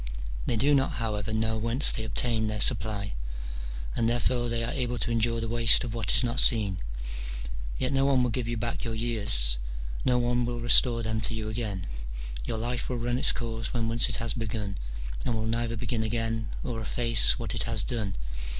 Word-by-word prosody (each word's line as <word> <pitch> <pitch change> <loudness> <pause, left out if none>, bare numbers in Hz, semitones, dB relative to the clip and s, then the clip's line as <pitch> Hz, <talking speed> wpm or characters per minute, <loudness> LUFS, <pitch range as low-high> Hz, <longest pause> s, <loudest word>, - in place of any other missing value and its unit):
They - - +2
do 140 +6 +3
not, 135 -1 +2
however, 110 -2 -3
know 110 0 0
whence 115 +6 +3
they 110 - -3
obtain 110 0 0
their 105 0 -3
supply, 105 -3 +3 0.8
and 115 - +1
therefore 120 0 0
they 115 0 -1
are 115 - -2
able 125 -4 -2
to 120 - -1
endure 115 0 +1
the 115 - -3
waste 115 +1 +5
of 120 -3 -4
what 115 -1 -1
is - - +3
not 120 +1 0
seen: 105 -6 +5 1.0
yet 130 +2 -1
no 135 0 +2
one 135 -2 +3
will 125 - 0
give 120 -1 -2
you 120 0 -2
back 115 +1 -3
your 115 -2 -3
years, 105 - +3 0.4
no 125 -1 +2
one 120 0 +1
will 120 0 -3
restore 120 0 +5
them 110 0 -2
to 110 +1 +1
you 110 -1 -4
again: 105 -5 -4 0.6
your 110 - -3
life 120 +2 -3
will 125 - -2
run 120 +1 -1
its - - +4
course 115 0 -4
when 115 -1 0
once 115 +1 +1
it - - +1
has 115 -1 +1
begun, 105 -3 -4 0.5
and 120 - -1
will 110 0 -2
neither 115 0 -1
begin 115 +1 -2
again 115 0 -2
or 115 -3 -4
efface 115 0 +4
what - - -3
it - - -2
has - - +3
done. 105 -6 -3
115 Hz, 205 wpm, -27 LUFS, 110-120 Hz, 1.0 s, waste